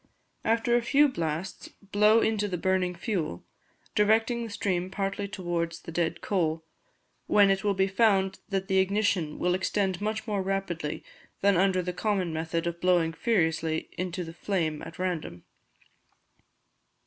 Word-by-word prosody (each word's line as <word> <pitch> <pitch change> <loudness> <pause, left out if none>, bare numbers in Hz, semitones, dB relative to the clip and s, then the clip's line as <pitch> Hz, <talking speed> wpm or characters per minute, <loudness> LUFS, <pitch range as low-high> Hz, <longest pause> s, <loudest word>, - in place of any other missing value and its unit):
After 230 +2 +2
a 240 - +3
few 280 +5 +4
blasts 170 - -4 0.2
blow 210 +2 +5
into 210 -2 +1
the 180 -3 -3
burning 185 0 0
fuel, 170 - -3 0.5
directing 225 +3 +2
the 230 - -5
stream 185 -3 -1
partly 195 +1 -2
towards 175 -4 -3
the - - -8
dead 165 0 -1
coal, 160 -4 -1 0.6
when 200 -1 +5
it 195 +1 0
will 205 -1 +1
be 190 +1 +3
found 195 -1 +2
that 195 -1 -1
the 190 -2 +3
ignition 190 -5 +1
will 180 0 +1
extend 190 0 0
much 215 +1 -2
more 205 -3 -1
rapidly 185 -5 -3 0.4
than 200 0 +4
under 185 0 +2
the 180 0 -3
common 190 -4 -1
method 165 +1 -2
of 170 0 -3
blowing 175 -3 +3
furiously 165 -6 0
into 180 0 -3
the 165 -1 -8
flame 165 -5 -2
at 165 - -9
random. 170 - -3
190 Hz, 150 wpm, -28 LUFS, 170-205 Hz, 0.6 s, blow